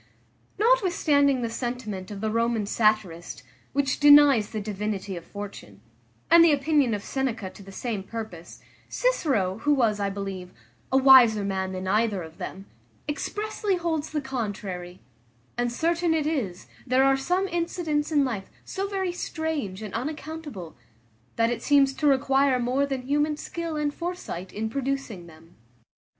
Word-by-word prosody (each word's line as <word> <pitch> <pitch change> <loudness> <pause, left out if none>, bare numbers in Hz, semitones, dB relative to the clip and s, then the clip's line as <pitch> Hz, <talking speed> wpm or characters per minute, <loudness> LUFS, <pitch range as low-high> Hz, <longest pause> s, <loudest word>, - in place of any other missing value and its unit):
Notwithstanding 340 - +3
the 230 - -1
sentiment 230 -6 -4
of 200 -2 -7
the 220 0 -1
Roman 230 -1 +1
satirist, 210 -5 0 0.3
which 275 -1 0
denies 290 -7 +7
the 220 - -4
divinity 205 -1 -4
of 170 - -7
fortune, 205 +2 -9 0.5
and 335 0 +9
the 335 - +6
opinion 285 -4 +2
of 200 - -6
Seneca 235 -8 -3
to - - -14
the 195 0 -12
same 215 0 -3
purpose; 195 -5 -8 0.3
Cicero, 245 - 0
who 290 +4 +2
was, 225 -6 +2
I 200 -1 0
believe, 195 -2 -6 0.4
a 265 - +4
wiser 255 -6 +7
man 190 -1 -2
than 185 0 -5
either 210 -2 +1
of 160 0 -12
them, 195 +1 -7 0.4
expressly 415 +6 -2
holds 325 -3 -2
the 305 -1 -2
contrary; 200 -9 -5 0.5
and 240 0 -1
certain 335 +5 +1
it 310 -2 0
is, 240 - -2 0.2
there 255 +2 +4
are 270 0 +4
some 360 +8 0
incidents 335 -3 -1
in 290 -3 +3
life 215 -7 -4 0.2
so 390 0 -3
very 385 -2 -2
strange 315 - -4
and 210 - -7
unaccountable, 295 - -6 0.6
that 230 +1 +2
it 235 -1 -3
seems 275 -1 +4
to 295 +2 0
require 270 -1 +3
more 255 +3 0
than 270 -2 -3
human 295 +3 0
skill 335 0 -5
and 295 -1 -1
foresight 335 - -5
in 220 +2 -3
producing 260 -7 -3
them. 165 +1 -17
255 Hz, 155 wpm, -26 LUFS, 205-295 Hz, 0.6 s, and